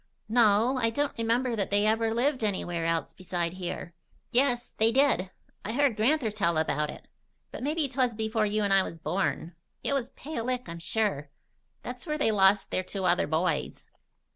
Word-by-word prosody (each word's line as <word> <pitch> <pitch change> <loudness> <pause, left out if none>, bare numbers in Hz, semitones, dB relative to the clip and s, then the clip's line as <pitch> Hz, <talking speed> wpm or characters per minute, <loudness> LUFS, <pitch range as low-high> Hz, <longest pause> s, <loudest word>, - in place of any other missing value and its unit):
"No. 225 +2 +4
I 230 - +3
don't 285 +5 -1
remember 235 +2 0
that 200 -3 -1
they 205 +1 +2
ever 225 +1 +2
lived 255 +2 0
anywhere 175 -5 -1
else 165 -1 -1
beside 175 -2 -3
here." 180 -2 -5 0.4
"Yes, 245 -1 +1
they 220 +1 +5
did. 265 -8 +3 0.3
I 215 - -3
heard 275 -2 +2
Gran'ther 235 +2 +1
tell 170 -6 0
about 150 -1 0
it. - - -10 0.4
But - - -7
mebbe 300 +2 0
'twas 250 -3 0
before 220 0 0
you 210 +1 0
an' 200 - 0
me 195 0 +6
was 170 - -5
born. 165 -1 -2 0.3
It - - 0
was 260 -3 -1
Pale 280 -6 -6
Lick, 250 -3 -2
I'm 170 0 -7
sure. 165 -4 -1 0.5
That's - - -7
where 300 0 -1
they 255 -7 +2
lost 195 -1 +3
their - - +1
two 190 +1 -4
other 175 0 +2
boys." 160 0 -2
215 Hz, 185 wpm, -28 LUFS, 180-245 Hz, 0.5 s, me